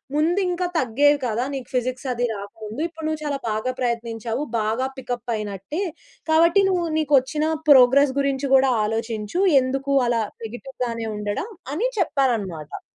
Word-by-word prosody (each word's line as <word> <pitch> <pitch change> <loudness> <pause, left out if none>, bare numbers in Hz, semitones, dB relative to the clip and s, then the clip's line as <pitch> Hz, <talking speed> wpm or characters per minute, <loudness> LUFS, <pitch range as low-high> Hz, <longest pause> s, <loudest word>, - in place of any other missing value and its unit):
ముందింకా 355 +3 +1
తగ్గేది 285 +3 +3
కాదా! 235 +1 0
నీకు 260 -3 -6
ఫిజిక్స్ 255 +1 -2
అది 245 +1 -2
రాకముందు. 215 +4 -8
ఇప్పుడు 320 -2 -9
నువ్వు 310 -1 -2
చాలా 285 -1 -1
బాగా 215 +4 -1
ప్రయత్నించావు. 235 +1 -2 0.2
బాగా 220 +4 0
పికప్ 245 -2 -4
అయినట్టే. 210 - -4 0.5
కాబట్టి 335 +5 +5
నువ్వు 355 -2 +1
నిక్కొచ్చిన 300 0 +2 0.2
ప్రోగ్రెస్ 265 +1 +7
గురించి 275 0 0
కూడా 265 0 +4
ఆలోచించు, 225 - -2 0.2
ఎందుకు 270 +2 -2
అలా 235 -1 +1 0.2
నెగెటివ్ 245 +4 -8
గానే 230 -1 -4
ఉండడం." 210 - -3 0.2
అని 465 +11 0
చెప్పారన్నమాట. 220 - -1
255 Hz, 135 wpm, -23 LUFS, 225-290 Hz, 0.5 s, ప్రోగ్రెస్